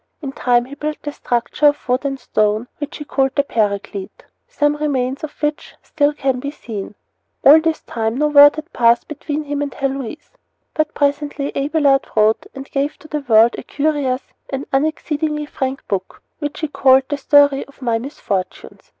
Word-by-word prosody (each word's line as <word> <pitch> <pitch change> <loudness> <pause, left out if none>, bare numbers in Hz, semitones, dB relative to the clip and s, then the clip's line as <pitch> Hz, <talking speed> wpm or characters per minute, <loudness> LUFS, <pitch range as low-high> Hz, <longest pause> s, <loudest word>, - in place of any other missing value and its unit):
In 275 -4 -5
time 245 -2 +2
he 265 - -11
built 300 +2 -5
a 290 - -2
structure 245 +2 0
of 290 0 0
wood 255 +3 0
and 270 -1 -2
stone, 215 -1 0
which 290 -1 -5
he 295 - -7
called 270 -2 0
the 280 - +3
Paraclete, 205 -4 -3 0.2
some 295 0 0
remains 275 -2 -1
of 310 - -7
which 295 0 -2
can - - -41 0.3
still 270 -2 0
be 280 +2 -4
seen. 210 -8 -7 0.5
All 305 +3 +9
this 320 -1 -1
time 225 0 -2
no 300 +2 +2
word 290 0 +8
had 315 +2 -8
passed 235 0 +3
between 300 0 -4
him 290 0 -3
and 285 -1 -2
Heloise. 275 +1 -4 0.4
But 310 0 -1
presently 285 0 -1
Abelard 280 -1 +2
wrote 215 0 +3
and 270 0 -7
gave 280 +1 -1
to 310 - -15
the 300 0 -2
world 235 -3 +5
a - - -5
curious 280 -3 -1 0.3
and 270 0 -4
exceedingly 300 +1 -1
frank 270 -2 -4
book, 190 -3 -4 0.2
which 290 -1 -4
he 310 - 0
called 265 -2 +4
The 290 - -2
Story 285 0 +4
of 280 -1 -16
My 230 -2 +1
Misfortunes. 205 -7 -5
280 Hz, 180 wpm, -19 LUFS, 250-295 Hz, 0.5 s, All